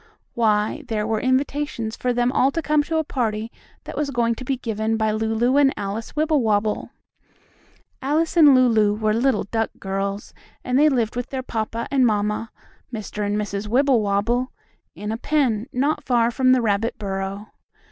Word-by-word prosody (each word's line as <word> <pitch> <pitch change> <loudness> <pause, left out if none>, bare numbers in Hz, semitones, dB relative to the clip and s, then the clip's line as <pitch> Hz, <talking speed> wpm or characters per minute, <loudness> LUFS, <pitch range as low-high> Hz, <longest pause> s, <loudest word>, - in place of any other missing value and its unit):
Why, 215 +4 +1
there 215 -2 -1
were 220 0 0
invitations 260 -3 -1
for 250 - -1
them 245 0 +1
all 265 0 +3
to 330 - -1
come 305 -1 +3
to 325 0 -1
a 315 - +1
party 225 -5 -2 0.3
that - - -8
was 300 -1 -1
going 235 -3 +1
to 245 - -8
be 265 +1 -1
given 220 -1 -2
by 220 -1 +1
Lulu 225 +4 +1
and 280 -2 +5
Alice 205 +5 -5
Wibblewobble. 225 -10 +1 1.1
Alice 310 +5 0
and 300 -5 +7
Lulu 225 -5 +4
were 215 0 0
little 235 0 +1
duck 225 +2 -1
girls, 195 +1 -4 0.3
and 255 +1 +1
they 305 +1 +6
lived 235 -5 0
with 245 0 -4
their 260 -1 -4
papa 230 -1 -3
and 270 -2 +3
mamma, 210 0 0 0.4
Mr. 215 -2 -5
and 205 0 -1
Mrs. 205 0 -3
Wibblewobble, 240 -1 +1 0.4
in 210 +1 -5
a 225 - -2
pen, 250 -5 0
not 280 +5 0
far 240 -2 +2
from 255 +1 +3
the 255 -2 +3
rabbit 220 +2 0
burrow. 195 0 -4
230 Hz, 170 wpm, -22 LUFS, 215-260 Hz, 1.1 s, and